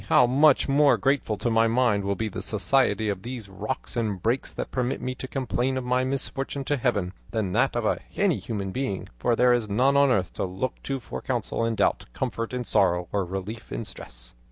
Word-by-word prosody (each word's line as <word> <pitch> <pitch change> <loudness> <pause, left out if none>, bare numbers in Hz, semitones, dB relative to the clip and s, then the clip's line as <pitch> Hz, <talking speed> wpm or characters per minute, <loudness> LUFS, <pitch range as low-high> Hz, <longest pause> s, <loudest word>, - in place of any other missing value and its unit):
how 125 - +6
much 140 +3 +4
more 145 +1 +4
grateful 135 -6 +1
to - - -2
my 115 0 +4
mind 115 -3 +2
will 100 0 0
be 110 - -2
the 105 - -5
society 110 -1 +1
of 100 -3 -2
these 120 -1 -6
rocks 100 +8 -5
and 110 -5 -1
brakes 120 +4 0
that - - -5
permit 125 0 -1
me 130 +1 -3
to 130 - -7
complain 130 0 -1
of 130 - -2
my 125 +1 +1
misfortune 135 +1 -2
to 145 - 0
Heaven, 110 -9 0 0.2
than 105 -5 -1
that - - +2
of - - +1 0.2
any - - +2
human 100 -4 -4
being, 125 -5 -3
for 120 - +2
there 125 +1 +5
is 115 -3 0
none 130 +7 +3
on 140 0 +5
earth 95 -9 +1
to - - -3
look 95 +7 -3
to 135 -1 -3
for 65 - -7
counsel - - -2
in 115 0 0
doubt, - - +1
comfort 115 0 -3
in 125 -1 -2
sorrow, 90 -6 +2
or 100 -1 +1
relief 95 +5 -6
in - - -3
distress!" - - -9
115 Hz, 215 wpm, -26 LUFS, 100-130 Hz, 0.2 s, how